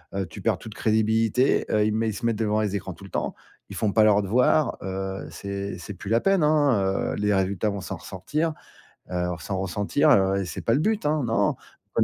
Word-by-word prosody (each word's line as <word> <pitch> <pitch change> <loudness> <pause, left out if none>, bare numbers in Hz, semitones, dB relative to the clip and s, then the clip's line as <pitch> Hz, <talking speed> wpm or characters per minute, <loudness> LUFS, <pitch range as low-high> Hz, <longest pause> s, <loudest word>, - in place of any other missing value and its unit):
heu, 95 -1 -1
tu 80 - -10
perds - - +1
toute 110 - -10
crédibilité, 110 +3 +2
heu, 105 0 +3
ils 110 - +1
mé 110 +1 0
ils 110 - -1
se 120 - -5
mettent 115 -2 +1
devant 110 -1 +1
les 100 -1 -1
écrans 95 -1 -4
tout 100 - -15
le 95 - -11
temps. - - -2 0.3
Ils - - -8
font 105 -2 0
pas 110 +1 +4
leurs 105 -1 +4
devoirs. 125 +6 +2
Heu, 95 0 -4
c'est 100 0 -5
c'est 100 - -8
plus 95 +2 -8
la 115 +1 +4
peine, 195 +2 +2
hein, 140 -11 +2
heu. - - -3
Les 105 0 +1
résultats 95 +2 0
vont 100 -1 -4
s'en - - -5
ressortir, 155 - -3 0.6
heu, 90 0 -1
s'en 95 +3 -3
ressentir, 105 - +1
heu, 95 -6 +4
et - - -3
c'est - - -6
pas 115 - +1
le 140 - +3
but, 215 +1 0
hein. 150 0 +2
Non, 115 -3 +1 0.4
on - - +6
105 Hz, 235 wpm, -25 LUFS, 95-115 Hz, 0.6 s, on